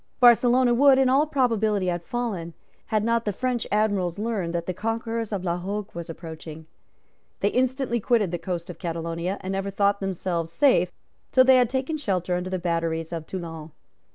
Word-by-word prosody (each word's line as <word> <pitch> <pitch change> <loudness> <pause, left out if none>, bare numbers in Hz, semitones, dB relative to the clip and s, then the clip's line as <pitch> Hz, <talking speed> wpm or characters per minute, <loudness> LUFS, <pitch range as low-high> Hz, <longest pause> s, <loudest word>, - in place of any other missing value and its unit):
Barcelona 245 0 +5
would 270 +2 +6
in 265 -1 +4
all 280 +4 +3
probability 220 -8 +1
have 175 -1 -1
fallen, 195 -8 -4 0.3
had 215 -2 +1
not 230 +1 +1
the 210 - -1
French 250 +2 -2
Admirals 205 -4 +1
learned 210 -5 -2
that 170 0 -2
the 185 - -2
conquerors 225 +2 -3
of 195 -3 -2
La 175 -1 -1
Hogue 200 +3 -4
was 170 -1 -7
approaching. 160 -1 -8 0.8
They - - +3
instantly 255 -1 0
quitted 215 -4 +1
the 175 - -3
coast 175 0 -4
of - - -14
Catalonia, 170 +2 -3
and 190 - -4
never 195 0 -2
thought 200 0 +1
themselves 180 -3 -2
safe 180 -4 +3 0.4
till 255 - +6
they 260 0 +6
had 245 -2 +3
taken 265 +4 -2
shelter 185 - -1
under 180 +1 -3
the 185 - -1
batteries 165 -1 -2
of 165 -2 -5
Toulon. 165 -4 -6
200 Hz, 180 wpm, -25 LUFS, 170-235 Hz, 0.8 s, would